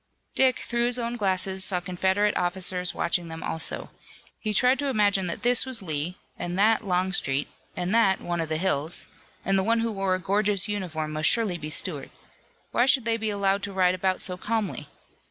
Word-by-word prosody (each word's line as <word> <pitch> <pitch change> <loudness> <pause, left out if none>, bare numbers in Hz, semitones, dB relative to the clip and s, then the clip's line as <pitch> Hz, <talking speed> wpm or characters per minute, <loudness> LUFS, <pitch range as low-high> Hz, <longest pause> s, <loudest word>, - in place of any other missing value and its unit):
Dick, 260 -2 +3
through 235 0 -1
his 245 0 +3
own 235 0 -3
glasses 190 -3 0
saw 185 -2 +2
Confederate 190 +3 0
officers 180 0 +2
watching 170 0 0
them 160 0 -8
also. 160 - -2 0.5
He 215 - -3
tried 250 +5 +3
to 285 - -1
imagine 205 -6 +2
that 170 - -5
this 245 0 +4
was 255 -5 -3
Lee 160 +2 -3 0.2
and 175 +1 -4
that 220 +3 +3
Longstreet, 180 -7 0 0.3
and 180 +2 -1
that 210 -5 +3
one 175 -1 -3
of 160 - -4
the 155 - -1
Hills, 160 -2 -1 0.4
and 195 0 +2
the - - 0
one 230 +2 +1
who 230 0 -1
wore 195 -2 0
a - - -4
gorgeous 200 +2 +1
uniform 170 -7 -4
must 155 +1 +2
surely 210 -7 +1
be 155 0 -6
Stuart. 150 -3 0 0.6
Why 240 - +2
should 265 -4 +4
they 230 0 +1
be 220 -1 -2
allowed 200 -1 0
to 200 0 -5
ride 185 -1 +3
about 185 0 -1
so 180 -1 +1
calmly? 215 +1 -3
190 Hz, 195 wpm, -25 LUFS, 180-220 Hz, 0.6 s, this